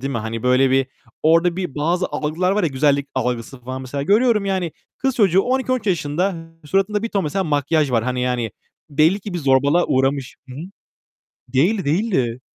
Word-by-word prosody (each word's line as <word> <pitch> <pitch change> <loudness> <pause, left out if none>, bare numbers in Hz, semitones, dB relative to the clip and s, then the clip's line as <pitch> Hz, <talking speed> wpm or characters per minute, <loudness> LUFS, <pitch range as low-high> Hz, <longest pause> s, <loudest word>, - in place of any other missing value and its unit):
değil 135 +2 -3
mi? 115 - -1
Hani 110 +1 -5
böyle 130 +1 +3
bir 135 0 +2 0.4
orada 165 +2 +3
bir 180 -8 -4
bazı 170 +5 0
algılar 155 +5 -1
var 210 -1 +1
ya 165 - +2
güzellik 140 0 +1
algısı 125 +1 -3
falan 130 +2 -6
mesela 140 +2 -4
görüyorum 210 - +3
yani 185 -4 -1 0.3
kız 265 -1 0
çocuğu 190 -4 +4
12-13 255 -2 -1
yaşında. 180 +1 0 0.3
Suratında 195 +6 0
bir 230 - -2
ton 200 -5 -1
mesela 190 +6 -1
makyaj 145 -1 +1
var. 115 -2 +1
Hani 125 0 -2
yani 125 -3 -1 0.4
belli 160 +7 +3
ki 195 -2 -7
bir - - -1
zorbalığa 140 +4 +3
uğramış. 135 0 0
Hı 125 - -9
hı. 145 - -7 0.9
Değildi, 190 +9 +2
değildi. 140 - 0
150 Hz, 180 wpm, -20 LUFS, 130-190 Hz, 0.9 s, çocuğu